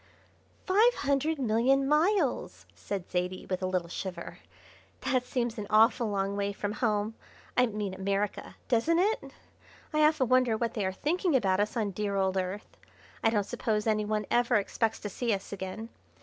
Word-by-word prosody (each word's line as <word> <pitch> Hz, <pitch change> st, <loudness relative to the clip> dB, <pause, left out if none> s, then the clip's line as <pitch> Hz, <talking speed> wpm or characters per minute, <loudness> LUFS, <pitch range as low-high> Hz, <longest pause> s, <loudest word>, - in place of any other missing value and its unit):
"Five 435 Hz, +6 st, +4 dB
hundred 285 Hz, +3 st, 0 dB
million 260 Hz, +2 st, +2 dB
miles!" 330 Hz, +8 st, +1 dB
said 195 Hz, -3 st, -5 dB
Zaidie, 180 Hz, +1 st, -2 dB
with 185 Hz, 0 st, -2 dB
a 185 Hz, -, 0 dB
little 185 Hz, -2 st, -1 dB
shiver; 180 Hz, 0 st, -6 dB, 0.6 s
"that 250 Hz, -1 st, 0 dB
seems 240 Hz, -2 st, -2 dB
an 205 Hz, -, -5 dB
awful 225 Hz, +2 st, +4 dB
long 200 Hz, 0 st, -1 dB
way 200 Hz, 0 st, -1 dB
from 205 Hz, 0 st, -3 dB
home 215 Hz, -1 st, 0 dB, 0.4 s
I 250 Hz, 0 st, +4 dB
mean 210 Hz, -3 st, -3 dB
America 195 Hz, +1 st, -2 dB
doesn't 255 Hz, +8 st, +2 dB
it? 410 Hz, +5 st, +2 dB, 0.7 s
I 305 Hz, -, +2 dB
often 305 Hz, -4 st, +4 dB
wonder 255 Hz, -2 st, +3 dB
what 230 Hz, 0 st, -1 dB
they 205 Hz, -4 st, -1 dB
are -, -, -1 dB
thinking 330 Hz, -, 0 dB
about 195 Hz, -6 st, +2 dB
us 210 Hz, +3 st, 0 dB
on 215 Hz, -3 st, 0 dB
the -, -, -8 dB
dear 205 Hz, +1 st, -2 dB
old 190 Hz, -1 st, +1 dB
Earth. 190 Hz, +2 st, -4 dB, 0.5 s
I 225 Hz, -, +5 dB
don't 210 Hz, -2 st, +1 dB
suppose 210 Hz, +1 st, -2 dB
any 215 Hz, -1 st, +2 dB
one 210 Hz, 0 st, -1 dB
ever 240 Hz, 0 st, +3 dB
expects 220 Hz, +2 st, 0 dB
to 205 Hz, -, -4 dB
see 230 Hz, +2 st, 0 dB
us 195 Hz, +1 st, -8 dB
again. 200 Hz, +4 st, -6 dB
215 Hz, 180 wpm, -29 LUFS, 200-255 Hz, 0.7 s, I